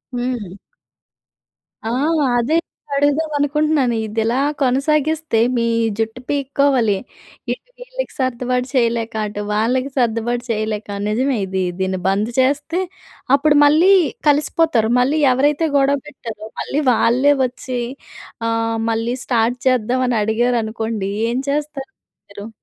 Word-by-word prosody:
హ్మ్. 240 Hz, -6 st, -3 dB, 1.3 s
ఆ! -, -, -1 dB, 0.5 s
అదే 255 Hz, +7 st, +1 dB, 0.4 s
అడుగుదాం 290 Hz, +3 st, +1 dB
అనుకుంటున్నాను. 290 Hz, -3 st, +1 dB
ఇది 215 Hz, +1 st, -3 dB
ఇలా 235 Hz, +3 st, +1 dB, 0.2 s
కొనసాగిస్తే 295 Hz, +1 st, +1 dB, 0.2 s
మీ 235 Hz, -, +1 dB, 0.3 s
జుట్టు 225 Hz, +2 st, -3 dB
పీక్కోవాలి. 275 Hz, -6 st, +2 dB, 0.6 s
ఇటు -, -, -7 dB
వీళ్ళకి -, -, -6 dB
సర్దుబాటు 250 Hz, 0 st, -1 dB
చేయలేక, 230 Hz, -2 st, +1 dB
అటు 205 Hz, 0 st, -5 dB
వాళ్ళకి 250 Hz, +5 st, +1 dB
సర్దుబాటు 240 Hz, 0 st, 0 dB
చేయలేక. 215 Hz, -1 st, -2 dB, 0.2 s
నిజమే 250 Hz, +4 st, 0 dB
ఇది 190 Hz, 0 st, -2 dB, 0.2 s
దీన్ని 190 Hz, 0 st, -1 dB
బంద్ 200 Hz, +3 st, +1 dB
చేస్తే 290 Hz, +6 st, +1 dB, 0.6 s
అప్పుడు 295 Hz, +1 st, +3 dB
మళ్ళీ 315 Hz, +6 st, +5 dB, 0.4 s
కలిసిపోతారు. 295 Hz, -5 st, +2 dB
మళ్ళీ 275 Hz, +5 st, +2 dB
ఎవరైతే 290 Hz, +5 st, +2 dB
గొడవ 280 Hz, +1 st, +3 dB
పెట్టారో 230 Hz, -6 st, -8 dB
మళ్ళీ 295 Hz, -, -1 dB
వాళ్ళే 255 Hz, +5 st, +3 dB
వచ్చి 250 Hz, 0 st, -5 dB, 0.7 s
"ఆహ్, 225 Hz, 0 st, 0 dB
మళ్ళీ 230 Hz, +2 st, -1 dB
స్టార్ట్ 240 Hz, 0 st, +1 dB
చేద్దాం" 255 Hz, 0 st, +2 dB
అని 245 Hz, -2 st, +1 dB
అడిగారనుకోండి. 220 Hz, -2 st, -1 dB, 0.2 s
ఏం 245 Hz, -, -1 dB
చేస్తారు 295 Hz, +2 st, -3 dB, 0.4 s
మీరు? 200 Hz, +1 st, -9 dB
250 Hz, 115 wpm, -19 LUFS, 225-285 Hz, 1.3 s, మళ్ళీ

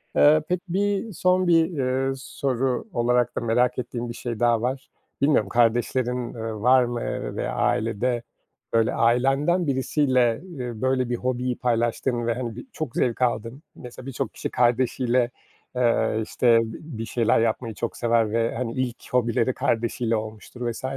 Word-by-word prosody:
Iıı, 155 Hz, +1 st, +6 dB
pek 180 Hz, -1 st, +1 dB
bir, 200 Hz, +4 st, -1 dB
son 185 Hz, +1 st, +2 dB
bir, 165 Hz, 0 st, +3 dB
ııı, 135 Hz, 0 st, 0 dB
soru 130 Hz, -, -2 dB
olarak 120 Hz, 0 st, +1 dB
da -, -, -2 dB
merak 125 Hz, +2 st, +1 dB
ettiğim 120 Hz, -1 st, -4 dB
bir -, -, -4 dB
şey 120 Hz, -2 st, -5 dB
daha 120 Hz, -2 st, +3 dB
var: 130 Hz, +2 st, -3 dB, 0.3 s
Bilmiyorum, 140 Hz, -9 st, +3 dB
kardeşlerin, 120 Hz, +1 st, +1 dB
ııı, 110 Hz, -2 st, -5 dB
var 125 Hz, +2 st, +5 dB
mı, 120 Hz, -1 st, -3 dB
eee, -, -, -4 dB
ve -, -, -2 dB
ailede 115 Hz, +2 st, 0 dB, 0.5 s
böyle 115 Hz, -1 st, +3 dB
ailemden 135 Hz, +9 st, +2 dB
birisiyle 130 Hz, -3 st, +2 dB, 0.4 s
böyle 130 Hz, -1 st, +1 dB
bir 120 Hz, -, 0 dB
hobiyi 125 Hz, 0 st, -1 dB
paylaştığın 120 Hz, 0 st, 0 dB
ve, 115 Hz, -, +2 dB
hani, 120 Hz, -2 st, -4 dB
birçok 155 Hz, -, -7 dB
zevk 120 Hz, 0 st, 0 dB
aldığın. 120 Hz, +3 st, -1 dB
Mesela 125 Hz, 0 st, -10 dB
birçok 135 Hz, -3 st, -4 dB
kişi -, -, -4 dB
kardeşiyle, 125 Hz, 0 st, +1 dB, 0.4 s
ııı, 115 Hz, -2 st, +2 dB
işte 115 Hz, +1 st, +3 dB
bir 115 Hz, 0 st, -7 dB
şeyler 115 Hz, -1 st, +2 dB
yapmayı 115 Hz, 0 st, -1 dB
çok 115 Hz, -, -4 dB
sever 115 Hz, -2 st, +2 dB
ve, 115 Hz, 0 st, 0 dB
hani, 115 Hz, -1 st, -3 dB
ilk 130 Hz, -2 st, -4 dB
hobileri 120 Hz, 0 st, +2 dB
kardeşiyle 115 Hz, 0 st, 0 dB
olmuştur 110 Hz, +2 st, -5 dB
vs. 115 Hz, -, -9 dB
125 Hz, 150 wpm, -24 LUFS, 115-130 Hz, 0.5 s, Iıı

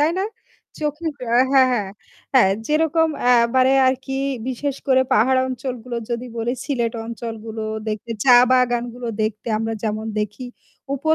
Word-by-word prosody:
তাই 305 Hz, +3 st, +3 dB
না? 390 Hz, -, 0 dB, 0.6 s
চোখে 300 Hz, +2 st, -3 dB, 0.2 s
হ্যাঁ, 240 Hz, +1 st, +3 dB
হ্যাঁ, 255 Hz, -7 st, +3 dB, 0.5 s
হ্যাঁ 240 Hz, -7 st, +6 dB, 0.2 s
যেরকম 320 Hz, +2 st, +2 dB, 0.3 s
এবারে 255 Hz, +3 st, +3 dB
আর 260 Hz, -, +4 dB
কি 270 Hz, -, -4 dB, 0.4 s
বিশেষ 270 Hz, +2 st, -3 dB
করে 260 Hz, -1 st, +4 dB
পাহাড় 260 Hz, +4 st, +4 dB
অঞ্চলগুলো 250 Hz, -2 st, -5 dB
যদি 235 Hz, +1 st, -3 dB
বলি 230 Hz, +1 st, -1 dB
সিলেট 240 Hz, -5 st, -1 dB
অঞ্চলগুলো 225 Hz, -1 st, -6 dB, 0.3 s
দেখতে 215 Hz, +2 st, -4 dB
চা 255 Hz, -2 st, +7 dB, 0.2 s
বাগানগুলো 245 Hz, -1 st, 0 dB, 0.2 s
দেখতে 215 Hz, +2 st, -3 dB
আমরা 225 Hz, +1 st, -2 dB
যেমন 215 Hz, 0 st, -2 dB
দেখি 210 Hz, +4 st, -4 dB, 0.5 s
উপর 315 Hz, +4 st, +2 dB
245 Hz, 140 wpm, -21 LUFS, 225-265 Hz, 0.6 s, চা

